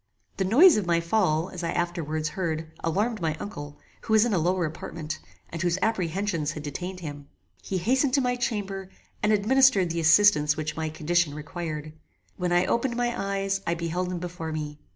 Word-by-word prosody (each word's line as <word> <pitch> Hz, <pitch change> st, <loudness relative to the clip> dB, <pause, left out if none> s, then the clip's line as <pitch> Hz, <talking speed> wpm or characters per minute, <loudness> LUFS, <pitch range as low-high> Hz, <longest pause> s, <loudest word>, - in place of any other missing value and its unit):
The 190 Hz, -, 0 dB
noise 290 Hz, -, +7 dB
of 200 Hz, -4 st, -1 dB
my 170 Hz, -1 st, +3 dB
fall, 170 Hz, -1 st, +1 dB
as 180 Hz, -1 st, -6 dB
I 165 Hz, -, -1 dB
afterwards 160 Hz, -3 st, -2 dB
heard, 160 Hz, -2 st, -3 dB
alarmed 210 Hz, +6 st, 0 dB
my 160 Hz, -2 st, 0 dB
uncle, 145 Hz, -6 st, -7 dB, 0.2 s
who 220 Hz, -, -2 dB
was 220 Hz, +1 st, +6 dB
in 235 Hz, -, 0 dB
a 185 Hz, -, +3 dB
lower 180 Hz, +2 st, +1 dB
apartment, 155 Hz, 0 st, -6 dB, 0.3 s
and 165 Hz, -, -4 dB
whose 175 Hz, 0 st, +1 dB
apprehensions 185 Hz, -6 st, -1 dB
had 150 Hz, -, -7 dB
detained 180 Hz, +6 st, -5 dB
him. 145 Hz, -3 st, -7 dB, 0.3 s
He 190 Hz, -, -3 dB
hastened 255 Hz, -, +2 dB
to -, -, +4 dB
my 250 Hz, -1 st, +1 dB
chamber, 200 Hz, -5 st, -3 dB, 0.3 s
and 210 Hz, -, +2 dB
administered 215 Hz, -3 st, +4 dB
the 170 Hz, -, -2 dB
assistance 160 Hz, -2 st, +5 dB
which 155 Hz, 0 st, -3 dB
my 160 Hz, -1 st, -2 dB
condition 155 Hz, 0 st, 0 dB
required. 155 Hz, -1 st, -5 dB, 0.4 s
When 180 Hz, -1 st, -2 dB
I 175 Hz, +1 st, +3 dB
opened 240 Hz, +4 st, 0 dB
my 240 Hz, 0 st, 0 dB
eyes 195 Hz, 0 st, -1 dB
I 170 Hz, -, +1 dB
beheld 175 Hz, +2 st, -2 dB
him 180 Hz, -, -3 dB
before 170 Hz, -2 st, -5 dB
me. 150 Hz, -1 st, -5 dB
175 Hz, 190 wpm, -26 LUFS, 155-205 Hz, 0.4 s, noise